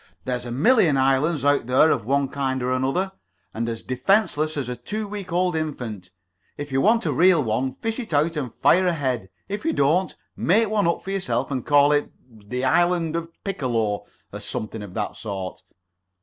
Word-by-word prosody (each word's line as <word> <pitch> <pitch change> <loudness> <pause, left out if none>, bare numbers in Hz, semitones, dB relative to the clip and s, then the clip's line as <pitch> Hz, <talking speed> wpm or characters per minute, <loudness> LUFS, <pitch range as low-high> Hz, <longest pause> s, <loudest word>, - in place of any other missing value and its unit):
There's 125 -1 -3
a - - -5
million 160 - +4
islands 135 +3 +2
out 145 -4 +2
there 130 +5 +5
of 115 -6 0
one 140 +2 +1
kind 130 -2 -2
or 125 - 0
another, 135 +10 0 0.4
and 115 +1 -2
as 115 -1 -5
defenceless 155 - +1
as 135 -4 -2
a 125 - -3
two 210 - -5
weeks' 200 -3 -7
old 180 0 +1
infant. 120 - -4 0.5
If 145 -1 -6
you 135 0 +2
want 225 +1 +3
a 155 - +1
real 170 +2 +5
one, 130 +3 -1
fish 225 - -3
it 235 - -6
out 155 +3 +2
and 135 -6 -3
fire 185 +9 +3
ahead. 130 - -1 0.2
If 205 +1 -4
you 325 - 0
don't, 165 +7 +2 0.2
make 215 +5 +2
one 210 -4 +1
up 170 - 0
for 195 - -5
yourself 135 -10 -1
and 130 -3 -2
call 145 0 +4
it 145 0 +1 0.2
'The 115 +2 -5
Isle 175 +1 +2
of 170 0 -3
Piccolo,' 120 - -1 0.3
or - - -5
something 110 0 -5
of 100 -3 -9
that 105 -2 -3
sort. 95 -4 -6
145 Hz, 190 wpm, -23 LUFS, 125-175 Hz, 0.5 s, there